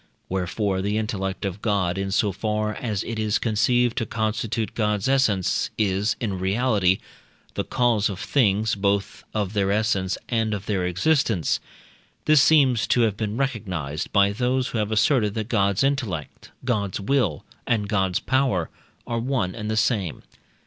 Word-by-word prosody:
Wherefore 95 +1 -1
the 105 +2 -1
intellect 95 -3 -3
of 100 +1 -4
God, 95 -5 +1
in 95 0 -2
so 100 +1 +1
far 105 +2 -1
as 105 -3 -3
it 115 -1 -4
is 110 -1 +1
conceived 120 +2 +2
to 115 - -2
constitute 110 0 -2
God's 105 -2 0
essence, 115 -9 +2
is, 105 +1 +1
in 100 -6 -2
reality, 95 -1 +2 0.6
the - - -2
cause 120 -5 +1
of 95 -3 -5
things, 110 -4 +2
both 100 0 -1
of 105 -2 -1
their 100 -2 +1
essence 100 -3 0
and 110 -3 0
of 100 0 -7
their 95 -4 0
existence. 105 - +1 0.7
This 155 -2 +6
seems 135 -8 +4
to 120 - +3
have 110 -4 +2
been 105 +1 -3
recognized 95 - -3
by 100 -1 +4
those 125 +4 0
who 115 - -2
have 105 0 -1
asserted, 110 -1 +2
that 110 0 -3
God's 100 -1 +2
intellect, 120 - -2 0.2
God's 105 -7 -1
will, 100 - 0 0.2
and 105 -3 +1
God's 95 -3 +1
power, 130 -11 0 0.3
are 115 -1 -2
one 120 -7 -1
and 110 -2 -5
the 110 - -1
same. 105 - 0
105 Hz, 160 wpm, -24 LUFS, 95-115 Hz, 0.7 s, This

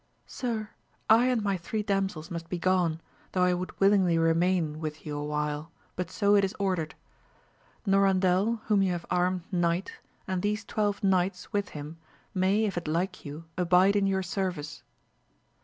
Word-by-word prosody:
Sir, 225 -4 -4 0.4
I 235 +3 +6
and 245 -4 +1
my 200 -2 +1
three 210 +5 -3
damsels 195 -5 -1
must 165 -1 -5
be 180 - -2
gone, 175 -2 +1 0.3
though 185 - +2
I 180 0 +4
would 180 +1 -5
willingly 195 -4 +4
remain 165 -1 +2
with 155 -1 -6
you 150 -1 -4
awhile, 150 +1 -3 0.2
but 180 -2 -3
so 200 +1 +2
it 200 - +4
is 195 - -1
ordered. 185 -6 -1 0.9
Norandel 195 +2 +3
whom 210 -2 +3
you 190 -2 +2
have 170 -1 -5
armed 180 0 +1
knight 175 0 0 0.3
and 185 -1 -1
these 210 +2 -1
twelve 205 -1 -1
knights 185 +1 +1
with 205 -2 0
him 150 +3 -8 0.3
may 195 +3 +2
if 195 -4 -2
it 170 - -11
like 170 +5 -2
you 150 +3 -7
abide 180 +3 +4
in 200 -1 +3
your 190 -1 +1
service. 180 -6 -3
185 Hz, 165 wpm, -28 LUFS, 165-200 Hz, 0.9 s, I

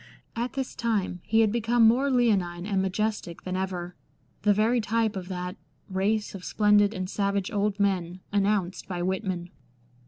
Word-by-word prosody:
At 235 +2 -2
this 270 -1 -3
time 210 -6 -1
he 225 +1 +3
had 215 -2 +3
become 235 0 +4
more 260 +5 +3
leonine 195 -9 +1
and 195 -2 +1
majestic 190 -2 -2
than 185 0 -3
ever 180 -2 -3 0.3
— - - -39
the 210 - +4
very 220 +4 +3
type 220 0 0
of 185 -2 -5
that 180 +1 -5 0.2
" - - -41
race 205 +3 0
of 190 -2 -8
splendid 210 0 +4
and 185 -4 -4
savage 200 0 -1
old 205 -1 0
men 185 -3 0
" - - -38
announced 200 -2 0
by 175 -2 -3
Whitman. 185 -2 -2
200 Hz, 180 wpm, -27 LUFS, 185-220 Hz, 0.3 s, become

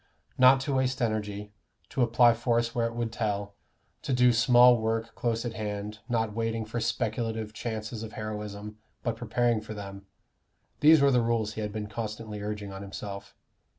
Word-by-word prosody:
"Not 130 +1 +7
to 135 +1 -2
waste 130 -1 +1
energy, 105 -2 -2 0.4
to 135 - -2
apply 120 0 +5
force 115 0 0
where 115 -1 +1
it 115 - -7
would 120 -1 -2
tell, 105 -3 -2 0.5
to 150 - -4
do 125 -1 +5
small 120 +1 +6
work 115 +1 -1
close 115 0 -1
at 120 - -3
hand, 105 0 -5
not 115 -3 0
waiting 115 0 -2
for 115 +2 -4
speculative 115 -1 -2
chances 110 0 -5
of 110 -1 -7
heroism, 105 0 -6 0.2
but 115 -2 -1
preparing 120 -1 0
for 110 0 -8
them" 100 -1 -8 0.7
these 155 +1 +7
were 140 0 +5
the 125 -2 +4
rules 115 -2 0
he 110 - -5
had 105 0 -3
been 105 0 -4
constantly 105 -1 -5
urging 105 -1 -5
on 95 - -7
himself. 100 0 -7
115 Hz, 175 wpm, -28 LUFS, 105-120 Hz, 0.7 s, Not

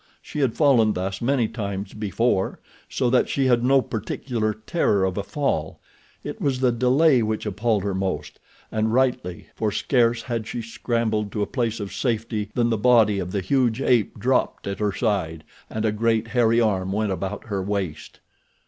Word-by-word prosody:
She - - -7
had 130 -5 +1
fallen 120 -8 +4
thus 95 +1 -3
many 120 -1 +2
times 100 -3 -5
before, 105 -1 0 0.3
so 130 - 0
that 130 - +3
she 135 - +1
had 120 -2 +3
no 135 +1 +4
particular 110 0 -2
terror 110 - 0
of 95 -1 -2
a 100 - -1
fall—it 100 - -5
was 135 -3 0
the 130 -1 +3
delay 130 +3 +4
which 110 0 -2
appalled 105 0 0
her 100 -1 -1
most, 95 0 -3 0.3
and 110 0 0
rightly, 125 -8 0
for 110 -2 -1
scarce 120 +1 +1
had 115 -3 -3
she 120 - -4
scrambled 110 -2 -1
to 105 - 0
a - - 0
place 115 -3 -2
of 100 -2 -5
safety 110 -3 -2
than 120 -1 +2
the 110 - 0
body 110 -4 +4
of 90 -1 -4
the 100 - -1
huge 120 +2 +1
ape 120 -5 +2
dropped 125 +5 0
at 100 0 -4
her 105 -1 +1
side 95 -8 -1 0.3
and 110 0 -3
a 110 - +2
great, 115 +1 0
hairy 115 -1 +3
arm 95 -5 +1
went 105 0 0
about 95 +2 -4
her 100 -4 -2
waist. 95 -5 -4
110 Hz, 180 wpm, -23 LUFS, 100-120 Hz, 0.3 s, fallen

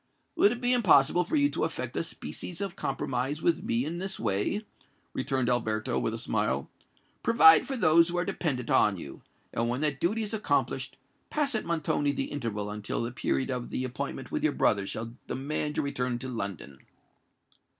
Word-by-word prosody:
"Would 205 - +5
it 240 0 -4
be 245 0 +3
impossible 180 - +5
for 245 - -2
you 285 -1 +4
to - - -2
effect - - -3
a - - +1
species 175 -1 -5
of 195 -2 -3
compromise 135 -2 -2
with 170 -1 +2
me 120 +3 0
in 170 +3 -4
this 190 +1 -2
way?" 110 - -1 0.5
returned 130 -1 -1
Alberto, 110 -3 0
with - - -1
a - - -4
smile. - - -1 0.5
"Provide 165 -9 +7
for 270 - -2
those 165 -4 +5
who 175 - -2
are 175 - +1
dependant 125 -8 -1
on 100 -3 +4
you; 70 -5 -9 0.3
and 115 0 0
when 125 +3 -1
that 150 -3 +1
duty 220 +6 +1
is 210 - -3
accomplished, 215 - -1 0.3
pass 290 -2 0
at 220 - -1
Montoni 150 -3 0
the - - -3
interval 105 -7 -3
until 105 +2 -2
the 115 - -3
period 130 +2 -1
of 125 -1 -3
the 130 - -2
appointment 125 - -5
with - - -2
your - - +2
brother 100 -2 +2
shall 115 +3 -5
demand 150 +2 -2
your - - +1
return 125 -3 -1
to 130 - -6
London." 100 - -5
140 Hz, 190 wpm, -29 LUFS, 120-175 Hz, 0.5 s, Provide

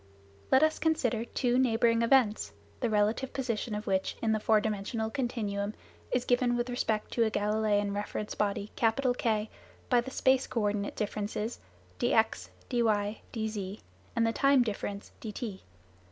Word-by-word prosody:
Let 265 +3 +6
us 315 0 +2
consider 245 -8 +1
two 245 0 +1
neighbouring 230 -2 +3
events, 230 -3 +3 0.3
the 240 - 0
relative 215 +5 +1
position 235 -4 -2
of 210 +1 -4
which 190 0 0
in 225 - +1
the 215 - +2
four 215 0 +4
dimensional 220 +1 -2
continuum 215 -6 -2 0.4
is 250 0 +1
given 245 -1 +2
with 240 +1 -1
respect 220 -3 -1
to 235 - +2
a - - +2
Galileian 210 -1 +1
reference 205 +1 -3
body 205 0 -1
K 225 -2 +1 0.4
by 245 -1 +5
the 250 - -7
space 260 0 +2
co 230 - -1
ordinate 205 -1 -1
differences 210 +2 -3 0.4
dx, 220 0 +2 0.2
dy, 245 -2 0 0.5
dz 215 -3 -4 0.3
and 230 -1 +3
the 225 - +1
time 275 -1 +4
difference 205 -2 -4
dt. 210 -2 -5
225 Hz, 150 wpm, -30 LUFS, 210-245 Hz, 0.5 s, Let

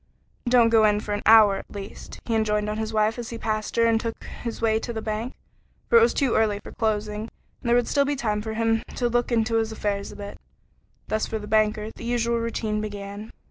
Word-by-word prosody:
"Don't 240 -2 +5
go 225 -1 +5
in 210 -1 +4
for 210 -1 -4
an 205 - -2
hour 215 -3 +7
at - - -9
least," 200 -1 -9
he 230 - -2
enjoined 210 -1 +1
on 210 +1 -2
his 220 0 -3
wife 220 +2 +1
as 235 - -5
he 230 - -5
passed 215 -1 -3
her 230 - +4
and 225 -1 +3
took 230 -1 -5 0.2
his 235 -2 -4
way 220 -1 +2
to 235 - -5
the 225 - -4
bank, 220 +3 -4 0.6
for 465 - +8
it - - +3
was 465 - +5
too 270 -5 +1
early 210 -2 +2
for - - -9
closing, 210 -1 -1 0.4
and 235 - -3
there 240 - +5
would 245 -1 +2
still 280 - +3
be 290 +1 0
time 215 -6 -1
for 220 0 -5
him 225 0 +1
to 245 - 0
look 240 +1 0
into 225 -1 +2
his 225 0 0
affairs 205 -2 -3
a - - -11
bit. 205 0 -8 0.7
Thus 215 0 -1
for 220 - -3
the 210 - -7
banker 215 0 +1
the - - -12
usual 235 0 0
routine 220 -2 -2
began. 205 0 -6
220 Hz, 240 wpm, -25 LUFS, 210-230 Hz, 0.7 s, for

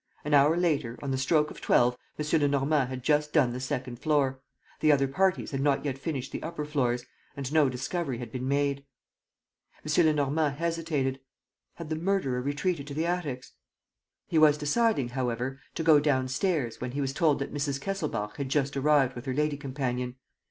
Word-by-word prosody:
An 150 - -1
hour 145 +3 +5
later, 150 -9 0
on 140 - -2
the 130 - 0
stroke 150 +3 +2
of - - -11
twelve, 125 0 +3 0.2
M. 150 - -2 0.2
Lenormand 140 -1 +2
had 130 -1 -6
just 150 +1 +2
done 130 -7 +3
the 125 - -4
second 130 -1 -4
floor; 140 -3 +1 0.4
the 155 - +4
other 135 -2 +3
parties 185 +7 +1
had 135 -1 -2
not 140 0 +1
yet 140 -2 -1
finished 135 -2 -4
the - - -5
upper 155 -2 -4
floors; 125 -5 0 0.3
and 140 +1 -4
no 155 -4 +5
discovery 130 +2 -3
had 120 -2 -7
been 130 +1 -4
made. 140 0 0 1.0
M. 155 +3 +3
Lenormand 150 -1 +1
hesitated: 160 -5 -1 0.6
had 165 -2 -8
the 160 - -1
murderer 160 -7 0
retreated 145 +2 -2
to 140 - -6
the 160 +2 0
attics? 155 -8 -3 0.7
He 160 - +2
was 150 -1 +6
deciding, 150 - +1
however, 125 +1 -2 0.2
to 165 - -2
go 160 -2 +6
downstairs, 135 - 0
when 125 0 -4
he 145 - -2
was 135 -1 -1
told 155 -1 +3
that 140 - -5
Mrs. 140 -1 -1
Kesselbach 140 - -3
had 140 -2 -3
just 140 0 0
arrived 140 -2 +3
with 120 - -8
her 130 - -1
lady 150 0 +1
companion. 130 -3 -3
140 Hz, 185 wpm, -28 LUFS, 130-155 Hz, 1.0 s, was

